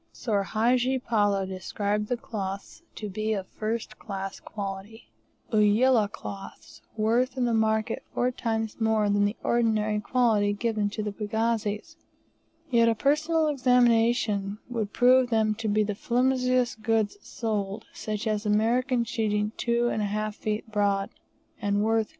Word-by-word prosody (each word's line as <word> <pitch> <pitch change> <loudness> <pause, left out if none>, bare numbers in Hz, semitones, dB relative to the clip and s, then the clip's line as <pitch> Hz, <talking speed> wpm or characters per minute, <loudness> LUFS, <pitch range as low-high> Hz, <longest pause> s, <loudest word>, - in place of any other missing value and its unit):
Soor 210 -4 -1
Hadji 245 +6 +1
Palloo 205 -5 +1
described 200 +3 -2
the 245 - -1
cloths 200 - -6
to 215 - -5
be 215 +2 -2
of 195 -3 -3
first 220 +1 -4
class 195 -2 -5
quality, 200 +2 -7 0.4
Ulyah 215 +1 +4
cloths, 195 -1 -9 0.2
worth 240 +4 +1
in 250 - +1
the 235 - +1
market 220 0 +1
four 250 +1 0
times 225 -2 -3
more 220 -2 +2
than 205 0 +3
the 205 +2 -1
ordinary 215 -3 +1
quality 210 -2 +2
given 215 -1 -1
to 215 +1 -4
the 210 - -2
pagazis, 220 +5 -2 0.7
yet 230 -1 +5
a 225 - +2
personal 310 +6 +2
examination 235 -6 +2
would 225 -4 -3
prove 250 0 +4
them 220 -2 +2
to 220 +1 -4
be 210 +1 +2
the 210 0 -2
flimsiest 250 +1 +1
goods 220 -2 +1
sold, 210 -2 -3
such 215 +1 -4
as 215 -1 0
American 235 +4 +2
sheeting 210 -2 -1
2 235 0 +1
1/2 215 0 -1
feet 215 +1 -4
broad, 200 -2 +1 0.5
and 205 0 +1
worth 225 0 +2
$2. - - -30
220 Hz, 145 wpm, -27 LUFS, 205-235 Hz, 0.7 s, yet